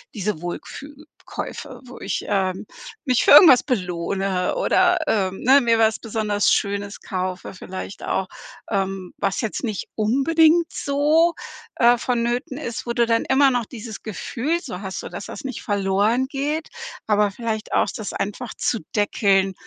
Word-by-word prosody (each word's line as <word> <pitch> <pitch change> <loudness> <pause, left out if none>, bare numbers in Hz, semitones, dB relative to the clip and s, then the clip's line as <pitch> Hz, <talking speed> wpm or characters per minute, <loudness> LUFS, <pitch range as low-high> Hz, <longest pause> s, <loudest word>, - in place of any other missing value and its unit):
diese 200 -5 -2
„Wohlfühl-Käufe“ 285 - -8
wo 250 - -11
ich, - - -3
ähm, 190 -1 -1 0.4
mich 255 -3 +2
für - - +4
irgendwas 290 -4 +9
belohne 185 - -1
oder, 360 -1 +3
ähm, 190 -3 0
ne? 270 +3 +6
Mir 230 -2 +3
was 220 -1 +3
besonders 210 -2 0
Schönes 200 0 -1
kaufe, 185 0 -4
vielleicht 190 +1 -8
auch, 190 - -1 0.4
ähm, 195 -2 -2
was 195 - -1
jetzt 220 - -3
nicht 215 -4 -3
unbedingt 315 +9 +3
so, 300 +4 +2 0.4
äh, 240 0 +5
vonnöten 245 +2 -1
ist, 240 -6 -5
wo 235 - -1
du 235 0 +3
dann 230 0 +1
immer 270 +1 +4
noch 245 -2 0
dieses 220 -2 -9
Gefühl 255 - -2
so 200 - -7
hast, 190 -1 -5
so - - -7
dass - - -7
das - - -8
nicht 260 -3 -5
verloren 205 +4 +1
geht, 295 +4 -3 0.4
aber 210 -1 +3
vielleicht 220 +1 -4
auch - - +3
das 215 - -5
einfach 205 +4 -4
zu 230 - 0 0.2
deckeln, 195 -2 +2
225 Hz, 155 wpm, -22 LUFS, 195-265 Hz, 0.4 s, irgendwas